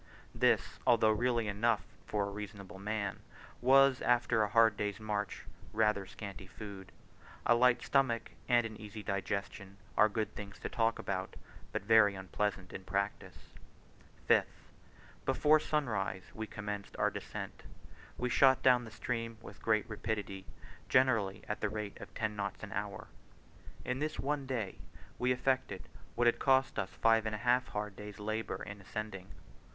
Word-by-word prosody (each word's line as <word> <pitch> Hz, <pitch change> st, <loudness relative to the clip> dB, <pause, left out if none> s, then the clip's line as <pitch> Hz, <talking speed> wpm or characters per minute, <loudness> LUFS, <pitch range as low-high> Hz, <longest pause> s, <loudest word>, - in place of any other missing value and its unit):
This, -, -, +2 dB
although 110 Hz, -2 st, +5 dB
really 120 Hz, 0 st, +1 dB
enough 105 Hz, +4 st, +1 dB, 0.2 s
for 100 Hz, -1 st, -1 dB
reasonable 100 Hz, -2 st, -8 dB
men, 100 Hz, -1 st, -2 dB, 0.4 s
was, 135 Hz, +1 st, +6 dB
after 120 Hz, -2 st, +3 dB
a 105 Hz, -, +2 dB
hard 115 Hz, 0 st, +5 dB
day's 105 Hz, 0 st, -2 dB
march, 105 Hz, -1 st, -3 dB, 0.3 s
rather 105 Hz, -3 st, +2 dB
scanty 100 Hz, -1 st, -8 dB
food: 100 Hz, -2 st, -9 dB, 0.5 s
a 120 Hz, -, +6 dB
light 120 Hz, 0 st, +4 dB
stomach 125 Hz, -7 st, +1 dB, 0.2 s
and 120 Hz, -1 st, +5 dB
an 110 Hz, -1 st, -6 dB
easy 105 Hz, 0 st, -8 dB
digestion 100 Hz, -1 st, -3 dB, 0.2 s
are 105 Hz, -, +6 dB
good 110 Hz, 0 st, -2 dB
things 100 Hz, -1 st, -8 dB
to -, -, -5 dB
talk 115 Hz, 0 st, +1 dB
about, 95 Hz, -1 st, -3 dB, 0.4 s
but -, -, -2 dB
very 105 Hz, -2 st, +6 dB
unpleasant 95 Hz, 0 st, -2 dB
in 95 Hz, -, -6 dB
practice. 100 Hz, +2 st, -3 dB, 0.8 s
5th. -, -, +5 dB, 0.8 s
Before 155 Hz, +1 st, +4 dB
sunrise 105 Hz, -12 st, -1 dB
we 110 Hz, 0 st, -5 dB
commenced 105 Hz, -1 st, -6 dB
our -, -, +2 dB
descent. -, -, -6 dB, 0.6 s
We 125 Hz, -, -1 dB
shot 130 Hz, +1 st, +5 dB
down 125 Hz, -2 st, +5 dB
the -, -, -8 dB
stream 115 Hz, 0 st, -3 dB
with -, -, -12 dB
great 110 Hz, -1 st, +2 dB
rapidity, 105 Hz, -3 st, -4 dB, 0.4 s
generally 115 Hz, -7 st, +3 dB
at 105 Hz, -, -3 dB
the 110 Hz, -, +1 dB
rate 105 Hz, -1 st, -5 dB
of -, -, -9 dB
ten 110 Hz, -1 st, -1 dB
knots 100 Hz, 0 st, -4 dB
an 105 Hz, -, -6 dB
hour. 100 Hz, -1 st, -4 dB, 0.8 s
In 125 Hz, +1 st, -1 dB
this 155 Hz, +1 st, -2 dB
one 140 Hz, 0 st, -1 dB
day 115 Hz, -7 st, -3 dB, 0.4 s
we 125 Hz, +1 st, +2 dB
effected 125 Hz, -6 st, 0 dB, 0.3 s
what 120 Hz, -, +2 dB
had 120 Hz, -, +4 dB
cost 130 Hz, -3 st, +3 dB
us 95 Hz, -2 st, -1 dB
five 115 Hz, -1 st, +3 dB
and 110 Hz, -, -2 dB
a 110 Hz, +3 st, -7 dB
half 125 Hz, +1 st, +4 dB
hard 105 Hz, -1 st, -4 dB
days' 105 Hz, -1 st, -8 dB
labour 110 Hz, +1 st, -3 dB
in 105 Hz, -1 st, -8 dB
ascending. 95 Hz, -2 st, -6 dB
110 Hz, 155 wpm, -33 LUFS, 100-120 Hz, 0.8 s, was